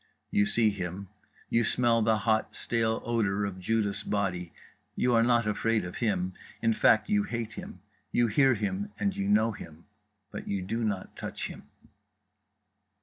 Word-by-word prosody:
You 100 0 +3
see 110 -2 +3
him, 95 0 -5 0.4
you 115 - +2
smell 115 0 +3
the 110 0 +3
hot 110 +1 0
stale 115 -1 0
odour 105 -4 +1
of 95 -2 -5
Judas' 105 +1 0
body; 90 -4 -2 0.4
you 125 - +2
are 115 - +5
not 120 0 +3
afraid 105 -1 +1
of 90 - -7
him, 95 -5 0 0.3
in 115 0 +2
fact, 110 0 +4
you 205 0 +3
hate 115 - -4
him; 90 - -9 0.3
you 120 - +3
hear 130 +4 +4
him 100 -1 -3
and 200 -1 0
you 200 0 -2
know 205 - +4
him. 80 -5 -11 0.5
But - - -7
you 100 -2 -2
do 115 +5 -2
not 100 -4 -3
touch - - -5
him. - - -11
110 Hz, 165 wpm, -29 LUFS, 100-115 Hz, 0.5 s, are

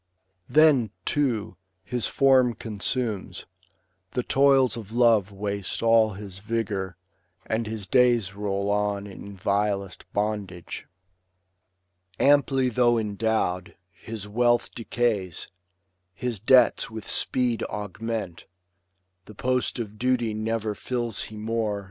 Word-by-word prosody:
Then, 150 -7 +5 0.2
too, 130 -8 0 0.3
his 120 +4 -1
form 130 -3 +4
consumes, 105 -3 -3 0.7
the 125 - -1
toils 135 -2 +4
of 110 -3 -8
love 115 -4 +3
Waste 100 0 -3
all 115 -2 +4
his 95 -1 -8
vigour, 100 -4 -3 0.5
and 110 0 -1
his 110 -2 -4
days 120 -5 +3
roll 100 0 -2
on 105 -1 0
In 100 0 -10
vilest 100 0 -1
bondage. 100 -4 -3 1.3
Amply 140 -2 +4
though 120 0 +3
endow'd, 105 -3 -1 0.2
His 105 +3 -8
wealth 120 +2 +2
decays, 110 -7 -1 0.7
his 120 -1 -3
debts 125 +3 +4
with 110 -1 -8
speed 125 -3 0
augment. 105 -2 -5 0.8
The 110 - -13
post 125 +3 0
of 110 -3 -6
duty 120 -3 +1
never 110 0 -2
fills 120 0 -3
he 110 - -10
more. 110 -1 -1
110 Hz, 110 wpm, -26 LUFS, 100-120 Hz, 1.3 s, Then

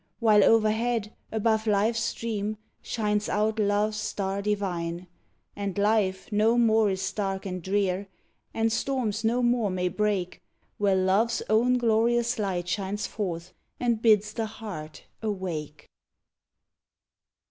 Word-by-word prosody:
While 215 -3 +5
overhead, 225 0 +2 0.2
above 220 0 +1
life's 215 +2 +2
stream, 215 -2 -2 0.2
shines 210 -2 -1
out 215 +1 0
love's 210 +1 +1
star 200 -2 -2
divine. 180 -4 -2 0.5
And 200 -1 -4
life 205 -2 +1
no 220 +3 +3
more 220 -2 +4
is 190 -1 -2
dark 195 -2 -2
and 185 -1 -4
drear, 195 +1 0 0.4
and 225 0 0
storms 230 -3 -1
no 240 +3 +1
more 240 -3 +2
may 180 -1 -1
break 195 -1 -1 0.4
Where 200 -2 +3
love's 195 +5 +2
own 245 +3 +4
glorious 235 +1 +2
light 185 -4 -2
shines 200 +2 -2
forth 180 -4 -4 0.3
and 235 -3 0
bids 215 -2 +4
the 225 -1 -2
heart 200 -9 -8 0.2
awake! 180 -8 -4
210 Hz, 125 wpm, -27 LUFS, 190-225 Hz, 0.5 s, While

